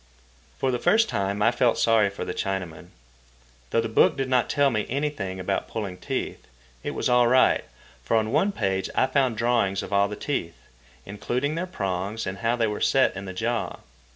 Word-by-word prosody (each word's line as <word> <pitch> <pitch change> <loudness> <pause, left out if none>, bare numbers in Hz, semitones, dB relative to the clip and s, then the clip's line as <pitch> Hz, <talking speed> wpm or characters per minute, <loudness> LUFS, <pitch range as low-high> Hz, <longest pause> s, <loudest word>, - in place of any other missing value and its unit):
For 130 - 0
the 125 - -1
first 220 - +3
time 100 +1 -1
I 115 - +5
felt 120 0 +2
sorry 110 -3 +3
for 100 - -6
the 90 - -4
Chinaman. 90 -4 -4 0.8
Though 115 - +2
the 115 - -2
book 110 +5 +3
did 135 -1 -2
not 125 -2 +2
tell 145 -2 +3
me 105 -2 -1
anything 135 -9 -3
about 95 +1 -2
pulling 100 -5 -5
teeth, - - -4 0.3
it - - -4
was - - 0
all 125 -1 +4
right, 130 +2 +4 0.4
for 115 - +1
on 110 0 0
one 200 +9 +2
page 95 - -1
I - - +4
found 130 -4 +1
drawings 115 -5 +1
of 95 - -7
all 100 0 +4
the 105 - -6
teeth, 105 - -3 0.5
including 120 +8 -2
their 170 +3 -3
prongs 100 - -3
and 95 +1 -5
how 115 +1 +1
they 115 -2 +1
were 105 -1 -3
set 135 - +3
in 95 - -6
the 95 - -6
jaw. 115 +5 -2
115 Hz, 200 wpm, -25 LUFS, 95-130 Hz, 0.8 s, I